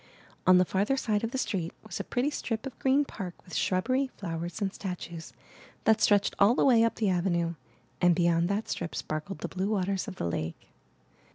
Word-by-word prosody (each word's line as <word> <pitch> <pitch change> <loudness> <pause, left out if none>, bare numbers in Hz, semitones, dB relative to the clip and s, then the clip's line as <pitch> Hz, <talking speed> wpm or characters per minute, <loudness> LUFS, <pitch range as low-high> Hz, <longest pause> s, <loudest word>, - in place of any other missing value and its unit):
On 185 0 +8
the 180 - +5
farther 205 +10 +1
side 215 -5 0
of 230 - 0
the 265 - -3
street 180 -9 -2
was 220 - -6
a - - -2
pretty 255 +4 0
strip 225 -4 -3
of 270 - -7
green 275 +2 +3
park 185 -9 -6
with 180 - -13
shrubbery, 255 - +1
flowers, 170 -1 -4
and 200 -2 -1
statues, 175 -3 -6 0.5
that 220 0 +4
stretched 205 -2 +4
all 210 +5 +6
the - - +3
way 240 -4 +6
up 230 - +1
the 215 -3 +1
avenue, 170 -2 +1 0.5
and 175 -1 +5
beyond 170 0 +2
that 205 +2 -1
strip 170 - -4
sparkled 155 +5 -4
the - - -2
blue 190 +2 -2
waters 195 -2 0
of - - -6
the - - -3
lake. 85 -1 -4
195 Hz, 200 wpm, -29 LUFS, 175-225 Hz, 0.5 s, On